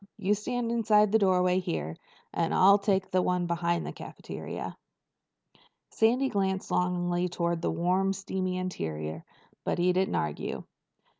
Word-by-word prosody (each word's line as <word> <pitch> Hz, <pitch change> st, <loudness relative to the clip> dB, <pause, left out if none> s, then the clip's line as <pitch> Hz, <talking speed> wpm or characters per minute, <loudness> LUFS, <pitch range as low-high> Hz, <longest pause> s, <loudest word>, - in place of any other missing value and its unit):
You 205 Hz, -1 st, +1 dB
stand 235 Hz, +3 st, -2 dB
inside 215 Hz, -3 st, +4 dB
this 220 Hz, -, +4 dB
doorway 185 Hz, -2 st, +3 dB
here, 80 Hz, -, -3 dB, 0.4 s
and 165 Hz, -1 st, 0 dB
I'll 200 Hz, +2 st, +6 dB
take 195 Hz, -2 st, 0 dB
the 185 Hz, -, +3 dB
one 180 Hz, -1 st, 0 dB
beyond 170 Hz, 0 st, 0 dB
the -, -, -5 dB
cafeteria." -, -, -7 dB, 1.2 s
Sandy 245 Hz, +5 st, +3 dB
glanced 190 Hz, -3 st, -1 dB
longingly 180 Hz, 0 st, 0 dB
toward 170 Hz, -1 st, -1 dB
the -, -, 0 dB
warm 180 Hz, +4 st, +1 dB
steamy 190 Hz, -1 st, -3 dB
interior, 80 Hz, -, -4 dB, 0.4 s
but -, -, -1 dB
he 180 Hz, +1 st, +3 dB
didn't 190 Hz, +1 st, +1 dB
argue. 75 Hz, -1 st, -3 dB
185 Hz, 140 wpm, -29 LUFS, 175-195 Hz, 1.2 s, I'll